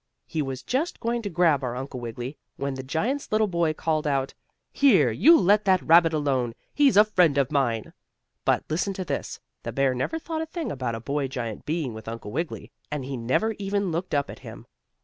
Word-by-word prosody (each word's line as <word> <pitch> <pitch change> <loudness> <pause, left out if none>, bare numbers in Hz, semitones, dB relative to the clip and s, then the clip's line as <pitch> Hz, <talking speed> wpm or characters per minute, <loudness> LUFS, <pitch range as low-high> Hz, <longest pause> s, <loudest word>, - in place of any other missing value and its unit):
He 160 - -2
was 135 -2 -4
just 290 +7 -1
going 235 +1 -1
to 205 - -4
grab 165 -5 +2
our 125 -1 -2
Uncle 130 0 -5
Wiggily, 120 +3 -6 0.2
when 140 0 -3
the 130 - -5
giant's 210 - -2
little 215 0 +3
boy 170 -5 +1
called 155 -1 -1
out: 135 -2 0 0.4
"Here, 195 - +5
you 320 - +6
let 205 +3 +4
that 185 -2 +3
rabbit 165 0 +6
alone! 135 -6 0 0.2
He's 280 -7 +4
a 210 - +8
friend 180 -9 +3
of 140 -1 +2
mine!" 120 -7 0 0.5
But, - - +2
listen 180 +5 -1
to 185 - -4
this, - - -4 0.2
the - - -5
bear 135 -1 +2
never 130 - -2
thought 320 0 -4
a 320 - -4
thing 330 0 -4
about 130 -4 -3
a - - -5
boy 140 +4 -2
giant 120 -5 -5
being 150 -6 -1
with 110 0 -10
Uncle 115 -2 -6
Wiggily, 165 +6 -4 0.2
and 150 -3 -4
he 135 0 -4
never 130 - 0
even 200 -1 -1
looked 170 0 -2
up 140 -1 0
at - - -11
him. - - -11
150 Hz, 210 wpm, -25 LUFS, 130-200 Hz, 0.5 s, a